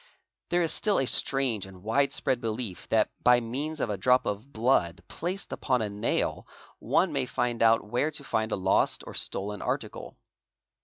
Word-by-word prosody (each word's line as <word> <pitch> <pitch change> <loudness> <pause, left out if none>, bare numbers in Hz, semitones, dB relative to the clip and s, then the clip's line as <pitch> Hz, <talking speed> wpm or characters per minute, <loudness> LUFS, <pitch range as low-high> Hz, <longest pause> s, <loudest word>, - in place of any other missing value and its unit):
There 175 0 +2
is 165 -1 +1
still 210 -2 +1
a 135 - +1
strange 125 -6 +2
and 95 -1 -14
wide 140 +6 +2
spread 125 -2 -1
belief 110 -4 -4
that - - +2
by 125 0 +6
means 140 +7 -4
of 115 - -1
a 100 - -2
drop 125 +4 +3
of 105 +7 -4
blood 100 -9 +1
placed 185 +4 -4
upon 125 -4 0
a 105 - -3
nail 105 +1 -1 0.3
one - - +1
may - - 0
find 120 -1 -1
out 115 -1 +4
where 120 +8 0
to 150 -2 -7
find 110 -4 -1
a - - +1
lost 95 0 +1
or - - -8
stolen 100 +1 -2
article. - - -4
120 Hz, 185 wpm, -28 LUFS, 105-135 Hz, 0.3 s, by